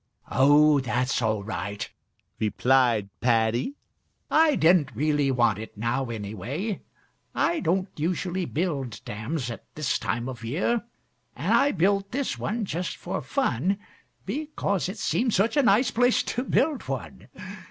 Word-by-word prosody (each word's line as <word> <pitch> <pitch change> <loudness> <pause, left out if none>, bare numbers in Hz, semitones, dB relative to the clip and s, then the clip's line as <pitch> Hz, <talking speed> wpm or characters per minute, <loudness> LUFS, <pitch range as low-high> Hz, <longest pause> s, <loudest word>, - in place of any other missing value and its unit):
"Oh, 145 +3 +5
that's 125 +1 0
all 110 -3 0
right," 100 0 -4 0.5
replied 115 -1 +2
Paddy. 120 - +1 0.6
"I 315 -2 +5
didn't 160 -7 +3
really 145 +1 +1
want 120 -5 +2
it 110 -1 -9
now, 115 +4 -1
anyway. 115 - -4 0.5
I 340 - +1
don't 185 +2 +1
usually 180 +3 -1
build 145 - -2
dams 120 +3 -3
at 115 - -8
this 150 -3 0
time 120 +2 -2
of 125 -3 -7
year, 180 - 0 0.5
and - - 0
I 285 - +4
built 195 +2 +1
this 275 +1 -2
one 220 0 -2
just 180 -1 -3
for - - -4
fun 135 - 0 0.5
because 205 - -2
it 200 - -6
seemed 235 +2 0
such 205 +8 +2
a 290 - +5
nice 235 0 +4
place 245 +1 +3
to 250 +3 -3
build 270 +5 +1
one. - - -5
150 Hz, 140 wpm, -26 LUFS, -, 0.6 s, Oh